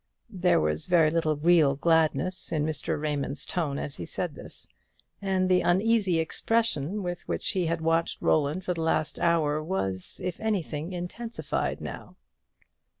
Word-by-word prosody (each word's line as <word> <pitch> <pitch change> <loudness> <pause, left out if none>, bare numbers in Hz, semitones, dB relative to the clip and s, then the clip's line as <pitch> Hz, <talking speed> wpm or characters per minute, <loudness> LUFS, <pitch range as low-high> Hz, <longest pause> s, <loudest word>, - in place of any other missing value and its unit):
There 180 -1 +3
was 75 0 0
very 165 -3 +4
little 160 -2 +1
real 155 -2 +4
gladness 165 +4 +1
in 150 -2 0
Mr. 155 -2 -1
Raymond's 145 -1 -2
tone 150 -6 -2
as 140 - -3
he 85 - -5
said - - -1
this; - - -2 0.5
and 190 -2 +1
the 185 -1 +4
uneasy 195 0 +2
expression 205 +1 0
with 175 -1 -5
which - - -1
he 180 -3 0
had 165 0 -1
watched 165 +1 +1
Roland 155 +4 +1
for 180 - 0
the 165 - -4
last 155 -1 0
hour 155 -3 +2
was, 95 - -3
if 180 -2 -3
anything, 175 -7 -2
intensified 185 +7 -3
now. - - -8
165 Hz, 150 wpm, -27 LUFS, 155-185 Hz, 0.5 s, very